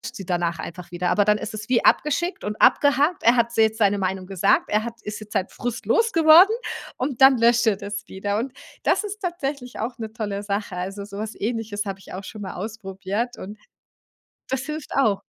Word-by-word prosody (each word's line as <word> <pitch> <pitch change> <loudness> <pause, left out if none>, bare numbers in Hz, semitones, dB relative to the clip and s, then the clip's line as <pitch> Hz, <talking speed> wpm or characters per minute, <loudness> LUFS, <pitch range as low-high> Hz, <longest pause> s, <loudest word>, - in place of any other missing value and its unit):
sie 195 - -7
danach 170 -2 -1
einfach 175 +2 -8
wieder. 175 0 -1
Aber 205 - +4
dann 210 0 +4
ist 215 +1 -6
es 215 +2 -7
wie 245 -2 +2
abgeschickt 340 +5 +2
und 210 +1 -4
abgehakt. 290 +4 +4
Er 235 +2 +6
hat 235 0 +2
se 225 - +3
jetzt 220 0 +1
seine 205 -1 +3
Meinung 190 -1 -2
gesagt. 195 0 +2
Er 210 +1 +1
hat 235 0 -7
ist 210 0 -6
jetzt 215 - -11
seinen 190 - 0
Frust 245 0 -5
los 460 0 +2
geworden 330 +4 +8 0.5
und 260 0 -3
dann 265 -1 +8
löscht 235 +1 +4
er 205 - +3
das 210 +1 -5
wieder. 200 +2 -3
Und 255 +3 -3 0.3
das - - +2
ist 415 0 -6
tatsächlich 280 -8 -4
auch 235 +3 -3
'ne 220 -1 -5
tolle 205 -3 -3
Sache. 200 -1 -3
Also, 195 +3 -5
so 200 -1 -9
was 220 +1 -5
Ähnliches 220 -1 -2
habe 195 -1 -5
ich - - -14
auch 190 +2 -6
schon 215 - -9
mal 195 - -6
ausprobiert 205 +3 -4
und 205 +3 -8 0.9
das 265 0 -1
hilft 305 -1 -6
auch. 220 -8 +3
215 Hz, 215 wpm, -23 LUFS, 200-255 Hz, 0.9 s, geworden